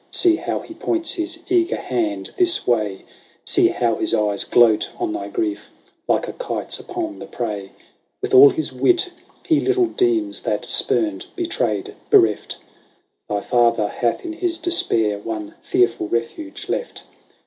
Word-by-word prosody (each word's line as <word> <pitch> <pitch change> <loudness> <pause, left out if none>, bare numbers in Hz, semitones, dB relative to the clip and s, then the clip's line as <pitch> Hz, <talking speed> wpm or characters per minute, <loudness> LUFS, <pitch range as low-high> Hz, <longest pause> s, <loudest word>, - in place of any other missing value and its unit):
See 345 -2 +3
how - - -3
he 330 - -11
points 335 0 -2
his 335 -2 -4
eager 355 -1 +2
hand 320 -3 -2
this 355 -2 +3
way! 105 -5 0 0.4
See - - +4
how 115 -2 0
his - - +1
eyes 105 -2 +1
gloat 115 -3 +4
on 350 -3 -2
thy 335 - -4
grief, 335 -4 -3 0.4
like - - +1
a - - -5
kite's - - -4
upon 345 -4 -5
the 165 - -8
prey! 105 -8 -5 0.5
With 405 +1 -4
all 405 +1 +10
his 330 -5 -2
wit, 360 0 +2 0.3
he 320 -5 +3
little 380 -2 +2
deems, 340 -3 0
that, - - -2
spurned, 330 +3 0
betrayed, 120 - -2 0.2
bereft. 110 -2 +3 0.7
Thy 105 -1 -1
father 120 -3 +2
hath 120 - -1
in 335 - -4
his 340 0 -2
despair 115 - +1
one 105 -1 -5
fearful 115 -3 +1
refuge 210 - -4
left. - - -4
320 Hz, 150 wpm, -21 LUFS, -, 0.7 s, all